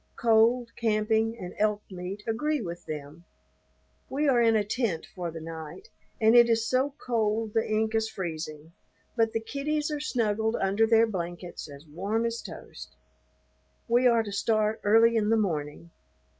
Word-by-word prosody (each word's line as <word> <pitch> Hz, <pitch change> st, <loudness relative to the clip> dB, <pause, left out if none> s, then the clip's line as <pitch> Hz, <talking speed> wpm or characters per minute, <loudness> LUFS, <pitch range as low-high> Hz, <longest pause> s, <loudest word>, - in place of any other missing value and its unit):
Cold, 230 Hz, +1 st, +3 dB
camping, 220 Hz, 0 st, +1 dB
and 180 Hz, -5 st, -7 dB
elk 210 Hz, 0 st, +1 dB
meat 185 Hz, +3 st, -6 dB
agree 300 Hz, +7 st, 0 dB
with 175 Hz, -5 st, -7 dB
them. 150 Hz, +2 st, -7 dB, 0.9 s
We 290 Hz, +3 st, 0 dB
are 250 Hz, -3 st, +4 dB
in 225 Hz, -1 st, +4 dB
a 215 Hz, -, +3 dB
tent 205 Hz, -6 st, -2 dB
for 175 Hz, -2 st, -4 dB
the 165 Hz, 0 st, -7 dB
night, 160 Hz, -, -9 dB, 0.3 s
and 220 Hz, +1 st, +5 dB
it 235 Hz, -1 st, +7 dB
is 225 Hz, -1 st, +2 dB
so 265 Hz, +3 st, 0 dB
cold 220 Hz, -2 st, 0 dB
the 225 Hz, -, 0 dB
ink 220 Hz, +1 st, 0 dB
is 220 Hz, 0 st, +1 dB
freezing, 160 Hz, -4 st, -6 dB, 0.4 s
but 225 Hz, -2 st, +2 dB
the 225 Hz, -, -1 dB
kiddies 295 Hz, +5 st, -2 dB
are 300 Hz, -, -2 dB
snuggled 220 Hz, -5 st, 0 dB
under 200 Hz, +3 st, +2 dB
their 225 Hz, 0 st, +5 dB
blankets 175 Hz, -5 st, -6 dB
as 140 Hz, +1 st, -12 dB
warm 200 Hz, +9 st, -2 dB
as 230 Hz, 0 st, -2 dB
toast. -, -, -10 dB, 0.9 s
We 245 Hz, +2 st, +4 dB
are 230 Hz, -2 st, +4 dB
to 205 Hz, -, -7 dB
start 215 Hz, +1 st, 0 dB
early 225 Hz, +3 st, +5 dB
in 215 Hz, -2 st, +1 dB
the 225 Hz, -, +4 dB
morning. 165 Hz, -4 st, -3 dB
220 Hz, 165 wpm, -27 LUFS, 180-230 Hz, 0.9 s, it